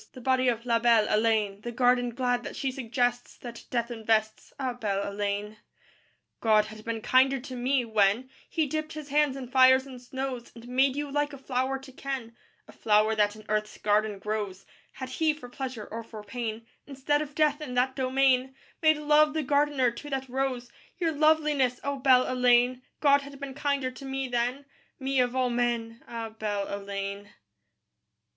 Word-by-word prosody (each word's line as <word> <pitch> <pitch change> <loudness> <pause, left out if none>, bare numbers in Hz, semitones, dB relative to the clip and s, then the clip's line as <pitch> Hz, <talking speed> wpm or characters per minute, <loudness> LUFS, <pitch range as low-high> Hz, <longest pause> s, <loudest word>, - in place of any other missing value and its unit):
The 255 - -10
body 260 +1 +2
of 235 -1 0
La 235 -1 +2
belle 230 -2 +4
Heléne; 215 -2 +1
The 240 - -5
garden 245 0 +2
glad 245 -1 0
that - - -7
she 270 - -2
suggests, 245 -1 -2
That 235 -1 -9
Death 235 -1 -1
invests, 220 -1 -1
Ah, 260 -2 -1
belle 205 -5 -2
Heléne. 205 +1 -2
III 215 - -19 0.8
God 215 -2 +4
had 215 0 -11
been 230 0 -3
kinder 265 +3 +3
to 260 0 -8
me, 250 +1 +1
when 220 +2 +2 0.2
He 320 -2 +1
dipped 310 +2 -3
His 305 -2 -8
hands 290 -1 +2
in 260 -2 -6
fires 260 0 +6
and 255 -2 -10
snows 260 -1 -5
And 235 0 -12
made 260 +2 +2
you 290 -1 -3
like 290 +1 0
a - - -7
flower 260 0 -1
to 270 0 -13
ken, 260 -3 -5 0.3
A - - -13
flower 215 0 +2
that 210 -1 +2
in 215 0 -13
Earth's 210 0 -1
garden 210 0 +1
grows, 200 -2 -4 0.3
Had 260 -1 -7
He, 310 +3 +1
for 250 -5 -11
pleasure 250 -4 -5
or 230 +1 -5
for 220 -2 -10
pain, 225 +1 -5 0.2
Instead 290 +1 0
of 295 -1 -6
Death 300 -1 +2
in 255 -5 -5
that 255 +1 +1
domain, 265 0 +2 0.3
Made 310 -1 +5
Love 300 0 +4
the 315 - 0
gardener 285 -2 +2
to 290 +5 -9
that 265 -1 -3
rose, 255 -1 -2 0.3
Your 335 -3 0
loveliness, 300 -4 +2
O 280 0 -2
belle 255 -1 +5
Heléne! 250 0 +3 0.2
God 280 -1 +5
had 280 0 -11
been 280 -1 -6
kinder 280 -2 -1
to 265 +2 -11
me 270 0 -3
then 245 +3 -1 0.3
Me 270 0 0
of 250 0 +1
all 255 -1 +1
men, 235 -1 -1
Ah, 230 -1 -5
belle 210 -2 -3
Heléne. 200 0 -5
250 Hz, 185 wpm, -28 LUFS, 225-270 Hz, 0.8 s, fires